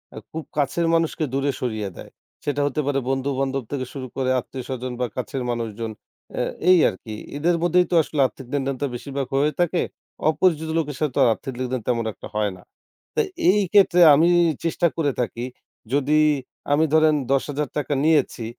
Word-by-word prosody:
আ - - -9
খুব 160 0 -5
কাছের 145 +4 +1
মানুষকে 165 -1 +1
দূরে 140 +1 +1
সরিয়ে 110 -5 -2
দেয়। - - -10 0.3
সেটা 145 0 0
হতে 150 +2 -1
পারে 140 -1 +1
বন্ধু-বান্ধব 135 0 -1
থেকে 130 -3 -2
শুরু 130 -2 -6
করে, 130 -1 0
আত্মীয়স্বজন 130 0 -6
বা 125 - +2
কাছের 125 +2 -3
মানুষজন। 115 -1 -4 0.5
আ - - +2 0.3
এই 185 - +8
আর - - -7
কি। 110 - -7 0.2
এদের 170 +3 +2
মধ্যেই 180 +1 +4
তো - - +2
আসলে 150 - -5
আর্থিক 135 -1 -13
লেনদেন 135 -1 0
তো - - +2
বেশিরভাগ 135 +1 -4
হয়ে 150 +2 +3
থাকে। 175 0 +1 0.5
অপরিচিত 160 -1 +1
লোকের 150 -3 -1
সাথে 150 -3 0
তো - - +1
আর - - +5
আর্থিক 135 +3 -7
লেনদেন, 130 -1 -2
তেমন 115 -2 0
একটা - - -10
হয় 105 -1 +1
না। - - -16 0.5
তো 455 - +3 0.3
এই 205 +1 +2
ক্ষেত্রে 190 -3 +5 0.2
আমি 160 +4 +4 0.4
চেষ্টা 170 +1 +2
করে 145 -4 +1
থাকি, 120 0 -3 0.5
যদি 145 +2 +3 0.5
আমি 155 +2 +4
ধরেন 155 -1 +5 0.2
৳১০,০০০ 145 +1 -1
নিয়েছি, 145 -7 +2
140 Hz, 180 wpm, -23 LUFS, 130-155 Hz, 0.5 s, এই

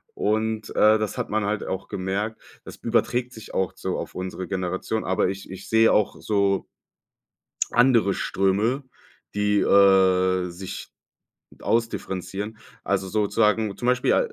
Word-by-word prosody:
Und, 110 0 -1
äh, 110 +1 +6
das 110 -2 -3
hat - - -3
man 110 -1 0
halt 105 +1 -1
auch 95 +1 -4
gemerkt. 100 +3 -3 0.2
Das - - -10
überträgt 120 +1 0
sich 110 -2 -11
auch 95 -2 0
so - - -3
auf - - -7
unsere 95 0 -5
Generation. 95 +3 -2
Aber 95 0 +1
ich 95 0 -7
ich 95 +1 -9
sehe 110 0 +5
auch 105 - +2
so 100 -2 +1 1.1
andere 120 -5 +4
Ströme, 105 +11 0 0.5
die, 105 0 +2
äh, 95 -2 +4
sich 90 +2 -8 0.7
ausdifferenzieren. 105 -2 -2 0.3
Also 95 -1 -1
sozusagen 105 +1 +1
zum 120 - -4
Beispiel 125 0 +3
a - - +4
105 Hz, 140 wpm, -24 LUFS, 95-110 Hz, 1.1 s, äh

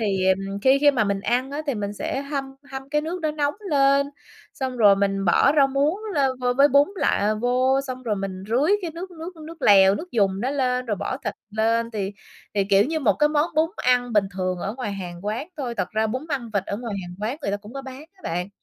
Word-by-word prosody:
thì 195 -4 0 0.4
khi 265 +1 +5
khi 290 0 +6
mà 245 -6 +1
mình 200 -1 -1
ăn 250 +5 0
á 295 +2 -4
thì 280 - 0
mình 205 -1 -3
sẽ 270 +6 -3
hâm 280 -1 -3 0.3
hâm 270 0 -6
cái 300 +1 +1
nước 335 +4 -4
đó 310 - 0
nóng 295 -1 -1 0.2
lên, 275 0 +4 0.5
xong 260 -2 -3
rồi 205 -4 +6
mình 195 0 0
bỏ 190 +10 +4
rau 280 -2 +6
muống 285 +7 +1 0.2
lên 275 -3 +3
vô 250 0 +1
với 280 +3 +6
bún 280 +2 +5
lại 215 - +1
vô, 255 +4 +2
xong 255 0 -6
rồi 220 -4 -1
mình 195 -1 -5
rưới 270 - +2
cái 345 - -3
nước 350 +4 -7
nước 340 +1 -9
nước 330 -2 -11
lèo, 195 -1 +7
nước 345 - -6
dùng 195 -4 +1
đó 250 +4 -1
lên 255 -3 0
rồi 210 -3 -1
bỏ - - -3
thịt - - -2 0.2
lên 230 +2 +1
thì 205 -3 -3 0.4
thì, 200 -1 +2
kiểu, 200 +1 +4
như 315 +3 -1
một 220 -8 +4
cái 300 - +4
món 300 +2 +1
bún 315 +2 +2
ăn 245 -1 +1
bình 210 -2 +4
thường 185 -1 -2
ở 200 +5 -4
ngoài 245 -6 -4
hàng 180 -1 -7
quán 225 - -3
thôi. 250 -5 -4
Thật 185 -2 -2
ra 220 0 +1
bún 255 +7 -4
măng 260 -6 -3
vịt 195 -2 +1
ở 200 - -3
ngoài 230 -2 -5
hàng 175 - -9
quán 230 +7 -2
người 200 - -1
ta 200 - 0
cũng 205 +3 -13
có 275 - -5
bán 265 +2 -9
á 380 - -26
bạn. 180 +3 -3
250 Hz, 250 wpm, -23 LUFS, 205-280 Hz, 0.5 s, lèo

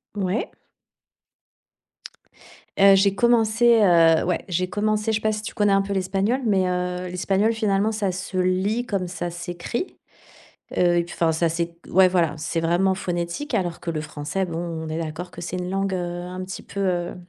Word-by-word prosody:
Ouais. 195 +2 -1 2.3
Heu, 195 0 +8
j'ai 195 0 +3
commencé, 235 0 +4
heu, 165 -4 +5
ouais, 180 0 -1
j'ai 180 0 -1
commencé, 215 +2 0
je 220 - +2
sais - - -7
pas 215 0 +1
si 210 - -4
tu 215 - -7
connais 205 -1 +2
un 195 - +4
peu 195 +1 -5
l'espagnol, 195 +6 0
mais, 195 -4 +2
heu, 180 0 -2
l'espagnol, 195 +4 +1
finalement, 215 -1 +1
ça 210 -3 -1
se 190 +1 -5
lit 190 +6 +1
comme 195 -5 -2
ça 175 0 -4
s'écrit. 175 - -5 0.8
Heu, 175 -1 +4
et 170 - +2
puis 175 - -10
enfin, 165 -1 +2
ça 165 +1 +1
c'est 170 +1 -3
ouais, 190 0 +6
voilà, 170 -5 +1
c'est 165 +2 -2
vraiment 175 +3 +2
phonétique, 175 - -3
alors 180 -7 -1
que 170 - -4
le 155 -2 -2
français, 155 +5 -3
bon 165 -2 -5
on 165 -2 -4
est 155 +1 -3
d'accord 165 +2 -5
que 175 - -10
c'est 175 +2 -4
une 180 0 -4
langue, 195 +1 -1
heu, 185 - 0 0.2
un 180 +1 -6
petit 190 +1 -7
peu, 200 - -7
heu, 175 -3 -1
185 Hz, 190 wpm, -23 LUFS, 175-200 Hz, 2.3 s, Heu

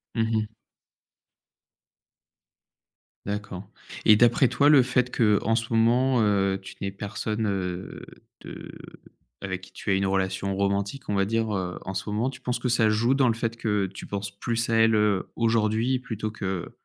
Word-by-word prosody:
Mmh 115 - +1 0.2
mh. 110 0 -1 2.8
D'accord. 100 -2 -5 0.4
Et 105 - +8
d'après 120 +4 +4
toi, 145 +4 +3
le 145 -3 +7
fait 125 0 0
qu'en 110 0 +2
ce 115 0 -2
moment, 120 +3 +3
heu, 100 -2 +1
tu 95 0 -11
n'aies 100 - -2
personne, 105 +2 -3
heu, 95 -2 -4 0.4
de - - -9 0.7
avec 95 -1 -4
qui 95 - -14
tu 100 - -4
as - - +4
une 95 0 +1
relation 95 0 -1
romantique, 100 +6 -2
on - - 0
va 100 0 +2
dire, 115 +1 -1
heu, 90 -2 -3
en 95 - -4
ce 95 +2 -4
moment, 110 +5 0
tu 130 - -13
penses 125 0 -2
que 125 - -1
ça 115 -2 +3
joue 115 +4 +2
dans 135 -1 +3
le 115 - +2
fait 115 0 -2
que 105 -3 0
tu 95 - -10
penses 100 0 -4
plus 115 +3 -2
à - - +2
elle, 115 0 +4
heu, 105 -3 +1
aujourd'hui 115 +2 +1
plutôt 110 -3 -5
que, 95 -5 -4
105 Hz, 175 wpm, -25 LUFS, 100-115 Hz, 2.8 s, Et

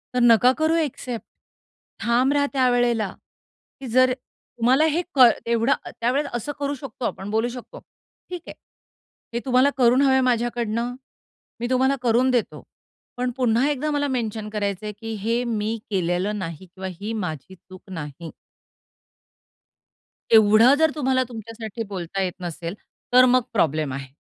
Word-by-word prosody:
तर 250 - +2
नका 240 +1 +6
करू 315 +1 +2
ॲक्सेप्ट. 255 -7 -3 0.8
ठाम 245 +3 +2
रहा 285 -1 +2
त्यावेळेला, 245 -4 +2 0.7
की 270 - -7
जर 255 0 +5
तुम्हाला 250 +2 -1
हे 345 - +1
कड 250 -3 +8
एवढं 235 +2 +2 0.3
त्यावेळेला 270 +5 0
असं 240 +5 -3
करू 285 0 -2
शकतो 255 -3 -7
आपण, 190 +2 -4
बोलू 220 +2 +1
शकतो. 375 - -10 0.5
ठीक 360 -1 -6
आहे. - - -7 0.8
हे 235 - -1
तुम्हाला 255 +2 +4
करून 250 +1 +4
हवंय 265 -1 +4
माझ्याकडनं. 235 0 -1 0.6
मी 240 - -2
तुम्हाला 260 +2 +2
करून 245 +2 +3
देतो. 245 -3 -1 0.5
पण 250 0 -1
पुन्हा 250 +2 +2
एकदा 295 +1 -1
मला 290 -1 0
मेन्शन 220 -2 -3
करायचंय, 205 0 -2
की 225 0 -5
हे 235 +2 +1 0.2
मी 220 +2 -2
केलेलं 190 +2 -1
नाही 170 0 -6
किंवा 190 +2 -8
ही 215 +2 -3
माझी 180 -4 -5
चूक 185 +1 -15
नाही. 160 -2 -7 2.0
एवढं 220 +3 +7
जर 320 -1 +4
तुम्हाला 260 -3 +1
तुमच्यासाठी 225 0 -7
बोलता 190 0 -4
येत 185 -2 -1
नसेल 170 0 -5 0.4
तर 255 0 +8
मग 255 0 +4
प्रॉब्लेम 155 -8 +1
आहे. 135 0 -6
235 Hz, 145 wpm, -23 LUFS, 205-255 Hz, 2.0 s, कड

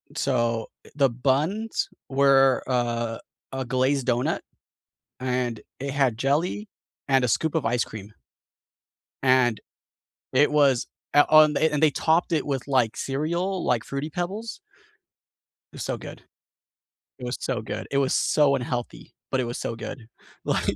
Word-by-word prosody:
so, 120 -4 0 0.2
eh - - -15
the 140 -2 +4
buns 145 - 0 0.2
were 135 -1 +4
a 120 -2 -1 0.3
a 130 0 -3
glazed 130 +1 +1
doughnut, 120 0 +1 0.8
and 125 -3 -1 0.2
it 140 - -3
had 135 -6 +1
jelly 160 - 0 0.4
and 135 -2 +4
a 125 - +1
scoop 160 +6 0
of 160 - 0
ice 120 +1 +1
cream. 105 -1 -10 1.1
And 130 -3 +3 0.7
it 145 +3 +4
was 140 -5 +3 0.3
at 145 - +5
on 155 -1 +7
and 155 -2 +1
they 155 -2 +5
topped 165 +5 +1
it 160 -3 +1
with, 135 -2 -3
like, 125 -5 +1
cereal, 170 +7 -2
like, 120 -3 +1
Fruity 140 +3 -4
Pebbles. 195 - -4 1.1
It - - -13
was - - -5
so - - -2
good. - - -10 1.0
It 125 - -8
was 125 - -2
so 125 -5 -2
good, - - -5
it 140 - +1
was 135 -1 +2
so 145 -2 +3
unhealthy, 125 -1 -5 0.2
but 130 - 0
it - - 0
was 120 0 -4
so 115 - -4
good. 115 +1 -7 0.4
Like - - 0
135 Hz, 150 wpm, -25 LUFS, 120-150 Hz, 1.1 s, on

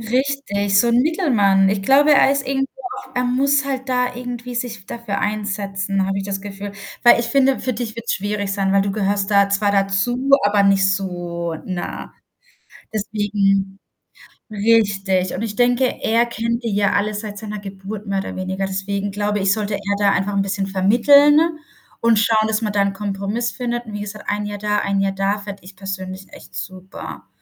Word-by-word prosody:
Richtig, 225 -5 0
so 240 - +4
'n 235 +1 +4
Mittelmann. 225 - +3
Ich 195 0 0
glaube, 285 +6 +5
er 275 -1 +5
ist 280 -1 0
irgendwo 270 0 0 0.3
auch 260 - -15
er 250 - +1
muss 275 +3 +2
halt 265 -1 -4
da 250 -1 0
irgendwie 245 0 -6
sich 230 -5 -4
dafür 230 -4 -4
einsetzen, 200 -2 -2
habe 195 0 -1
ich 195 - -3
das 195 -1 -3
Gefühl, 200 0 -7 0.3
weil 240 - +7
ich 235 - -1
finde, 270 +1 +3
für 255 - -2
dich 230 -1 -5
wird's 230 0 -2
schwierig 205 0 -2
sein, 195 -1 0
weil 200 - +4
du 195 0 -2
gehörst 200 -1 0
da 200 -1 +4
zwar 200 +1 +1
dazu, 200 +7 0
aber 205 0 +3
nicht 195 -1 +4
so, 175 -3 -4
na 180 -2 -5 0.8
deswegen 200 -2 0 0.7
richtig, 200 -4 +1
und 200 - -3
ich 210 -2 -4
denke, 245 +1 +3 0.2
er 230 +2 +3
kennt 235 +1 -2
die 230 - -1
ja 200 -1 +2
alle 210 +1 0
seit 210 0 -6
seiner 210 -1 -6
Geburt 200 +1 -8
mehr 195 -1 -1
oder - - -6
weniger. 190 +1 -2
Deswegen 195 +1 -3
glaube 205 +1 -1
ich, 195 0 +3
sollte 210 -1 -2
er 200 - -2 0.2
da 205 -1 +3
einfach 200 +1 0
'n 195 - +2
bisschen 195 0 -2
vermitteln 245 +10 +5 0.6
und 230 -1 +4
schauen, 220 -1 +3
dass 220 +1 -1
man 210 -2 -1
da 205 - +1
'n 200 0 0
Kompromiss 200 +4 -2
findet 240 -1 -4
und 215 - -8
wie 205 - -5
gesagt, 210 +1 -8
1 205 0 -1
Jahr 205 0 -5
da, 210 0 0
1 200 0 0
Jahr 195 0 +1
da, 195 +2 0
fände 200 -2 -9
ich 190 +1 -12
persönlich 190 0 -7
echt - - -14
super. 185 +1 -8
205 Hz, 195 wpm, -20 LUFS, 195-235 Hz, 0.8 s, weil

